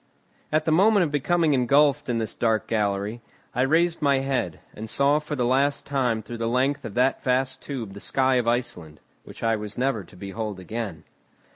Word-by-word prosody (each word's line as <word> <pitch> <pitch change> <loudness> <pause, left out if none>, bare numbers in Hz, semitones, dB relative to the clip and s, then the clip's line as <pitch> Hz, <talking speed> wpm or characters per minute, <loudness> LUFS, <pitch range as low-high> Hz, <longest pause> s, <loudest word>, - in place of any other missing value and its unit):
At 155 0 +1
the 160 - +1
moment 200 +4 +5
of 155 - -2
becoming 155 +2 +2
engulfed 140 +2 +3
in 120 - +1
this 110 -1 -3
dark 110 -2 0
gallery, 105 +1 -1 0.3
I 125 - 0
raised 165 +5 +2
my 140 -2 +3
head, 130 - -2
and 110 +1 -7
saw 140 +4 +3
for 150 0 -5
the 125 -3 0
last 135 +3 +1
time 125 -6 0
through 115 +2 -8
the 115 0 -1
length 130 +4 +1
of 100 - -7
that 130 +2 +2
vast 130 +1 0
tube 120 -8 -6
the 100 - -9
sky 130 +3 +1
of 120 -2 0
Iceland, 90 -10 -2 0.3
which - - -11
I 115 0 +2
was 105 -1 -7
never 125 -5 0
to - - -17
behold 100 +1 -5
again. 95 -3 -5
125 Hz, 195 wpm, -25 LUFS, 110-140 Hz, 0.3 s, moment